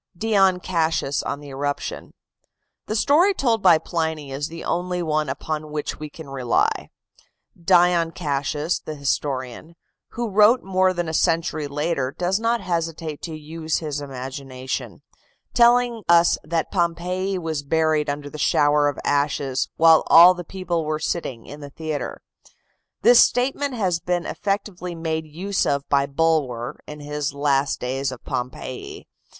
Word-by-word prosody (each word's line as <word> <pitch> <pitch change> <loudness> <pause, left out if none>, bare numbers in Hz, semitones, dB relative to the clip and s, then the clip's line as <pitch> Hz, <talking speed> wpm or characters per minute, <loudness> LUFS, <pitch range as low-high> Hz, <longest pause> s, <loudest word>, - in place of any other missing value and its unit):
DION 195 -3 +3
CASSIUS 160 -5 0
ON 140 - -4
THE 145 -1 -10
ERUPTION 145 +1 -4 0.7
The 215 - -2
story 335 - +4
told 230 - +1
by 175 -4 +6
Pliny 160 -4 -3
is 140 +2 -3
the 165 +1 -9
only 180 0 -2
one 155 -2 0
upon 155 +3 -4
which 150 -1 -4
we 155 0 -6
can 160 0 -11
rely. 130 -3 0 0.7
Dion 175 -1 +3
Cassius, 150 0 -2
the 155 - -7
historian, 140 +1 -3 0.4
who 240 0 -2
wrote 215 +5 +5
more 185 0 +2
than 175 -2 -3
a 160 - -4
century 165 -2 +1
later, 145 -2 -1
does 180 +3 0
not 230 0 0
hesitate 165 -4 -3
to 160 -2 -6
use 160 +1 -3
his 150 -3 -4
imagination, 130 -1 -6 0.5
telling 240 -1 +4
us 170 0 +6
that 165 +1 -2
Pompeii 180 +2 -1
was 160 -4 -3
buried 155 0 +1
under 145 +1 -5
showers 145 -1 +3
of - - -9
ashes 140 -2 0
"while 165 -1 +6
all 175 +2 +9
the 175 -1 -7
people 175 -2 -3
were 155 0 -1
sitting 150 -7 -4
in 145 - -10
the 145 -1 -9
theatre." 155 0 -5 0.8
This 240 0 +7
statement 270 +2 0
has 185 -7 0
been 175 0 -2
effectively 195 -3 -3
made 160 -1 -3
use 185 +6 -2
of 140 0 -1
by 140 -1 +2
Bulwer, 140 -6 0
in 150 0 -9
his 145 0 -3
"Last 140 -1 +1
Days 130 +2 -2
of 130 - -10
Pompeii." 130 0 -5
160 Hz, 145 wpm, -23 LUFS, 145-180 Hz, 0.8 s, all